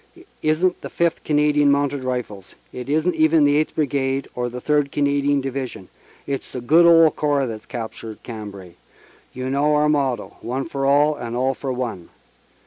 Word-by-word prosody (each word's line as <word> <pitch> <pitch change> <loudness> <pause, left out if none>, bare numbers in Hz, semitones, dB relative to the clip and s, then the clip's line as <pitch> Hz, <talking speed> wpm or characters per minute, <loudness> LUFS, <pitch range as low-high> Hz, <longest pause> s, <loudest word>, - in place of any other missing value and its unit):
"It - - -17 0.2
isn 155 +4 +2
t - - -23
the - - -7
Fifth 170 -1 0
Canadian 150 -1 +3
Mounted 140 -1 +1
Rifles; 125 -7 -5 0.2
it 125 +1 -7
isn 155 +4 +2
t 165 - -9
even 155 0 +4
the 145 0 +4
Eighth 155 +1 0
Brigade 135 -2 -1
or 125 0 -2
the 125 +1 -7
Third 145 +1 +1
Canadian 140 0 +1
Division 130 -7 -5 0.4
it 140 -1 -2
s - - -19
the 125 - -6
good 160 +8 +5
old 165 -2 +6
Corps 145 -2 +1
that 115 -3 -5
s - - -25
captured 115 -2 -7
Cambrai; 100 -6 -8 0.6
you 130 0 -5
know 145 +2 +2
our 150 0 +3
motto, 140 -5 -1
One 130 +3 -3
for 140 -4 -2
all 145 +2 +4
and 120 -3 -6
all 130 +2 +1
for 135 0 -5
one. 120 -9 -4
140 Hz, 195 wpm, -21 LUFS, 125-150 Hz, 0.6 s, old